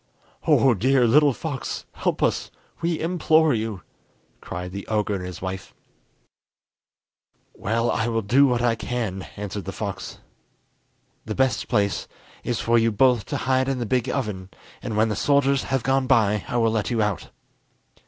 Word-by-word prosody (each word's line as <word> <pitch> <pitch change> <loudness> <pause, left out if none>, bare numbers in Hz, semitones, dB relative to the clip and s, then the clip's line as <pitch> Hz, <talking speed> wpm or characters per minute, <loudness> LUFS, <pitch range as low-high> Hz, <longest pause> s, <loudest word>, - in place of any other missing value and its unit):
"Oh, 135 -2 +5
dear 125 +5 +3
little 145 +5 +5
fox, 140 0 -5
help - - -2
us, - - 0 0.3
we 165 -1 0
implore 160 -2 +3
you!" 110 -4 -3 0.6
cried 90 +1 -6
the 100 +1 -7
ogre 105 -1 0
and 95 -2 -3
his 90 -1 -7
wife. 95 0 -6 1.8
"Well, 115 +3 0
I 110 - 0
will 115 -1 -1
do 135 +8 +5
what 120 -2 0
I 120 -1 +3
can," 110 -5 -4
answered 100 -2 -5
the - - -4
fox. - - -5 1.1
"The 110 - -4
best 130 -2 +1
place 100 -5 0 0.4
is 120 -3 -2
for 115 0 +3
you 115 0 +2
both 125 0 +3
to - - -3
hide 130 0 +2
in 135 - -1
the 120 - -2
big 125 +2 0
oven, 105 -9 -3 0.3
and 105 - -4
when 110 +1 +3
the 105 - -1
soldiers 140 -1 +2
have 135 -3 -1
gone 135 0 +1
by 105 -6 +3
I 120 - -2
will 115 -1 +3
let 110 -2 -1
you 115 -3 +1
out." 105 -3 -2
115 Hz, 165 wpm, -24 LUFS, 105-130 Hz, 1.8 s, Oh